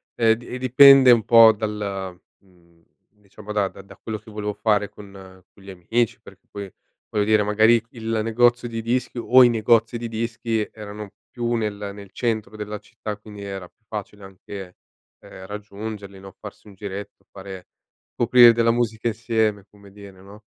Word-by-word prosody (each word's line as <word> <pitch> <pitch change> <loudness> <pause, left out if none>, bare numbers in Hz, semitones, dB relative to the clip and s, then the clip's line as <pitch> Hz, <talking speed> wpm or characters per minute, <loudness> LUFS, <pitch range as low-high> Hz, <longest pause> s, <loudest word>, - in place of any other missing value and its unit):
ehm, 115 -1 +4
di 120 - -14
e 125 - -6
dipende 130 +1 +7
un 115 -2 +4
po' 115 -1 +8
dal 100 -4 -5 0.2
mhmm, 85 -3 -27 0.3
diciamo 105 0 -13
da 105 -2 +1
da 95 0 -13
da 100 - -15
quello 110 -1 -6
che 110 +1 -16
volevo 105 -1 -4
fare 105 -2 0
con 105 -1 -14 0.4
con - - -21
gli 95 - -13
amici 105 +6 -2
perché - - -18
poi, 100 -1 -7 0.4
voglio 105 - 0
dire, 110 0 +3
magari 110 +3 +4
il 115 -1 -3
negozio 120 +2 +2
di 115 -1 -5
dischi 120 +2 -2
o 125 +2 +6
i 120 - +6
negozi 115 +1 +2
di 120 - -5
dischi 115 -1 -3
erano 105 -1 -9 0.2
più 120 -1 -3
nel 105 -3 -3
nel 100 -1 -12
centro 110 -3 -3
della 105 0 -6
città, 105 0 -8
quindi 105 -1 -12
era 95 -2 -7
più 110 - -49
facile 105 -1 -8
anche, 95 -1 -10 0.4
ehm, 95 - -13
raggiungerli, 105 -1 -8
no, 95 0 -12
farsi - - -12
un 105 - -13
giretto 100 +1 -8
fare 95 -1 -10 0.5
scoprire 120 0 +6
della 115 0 +2
musica 115 -1 -1
insieme 110 -3 -1
come 100 -1 -18
dire, 100 -2 -14
no? 100 +3 -15
105 Hz, 175 wpm, -22 LUFS, 100-115 Hz, 0.5 s, po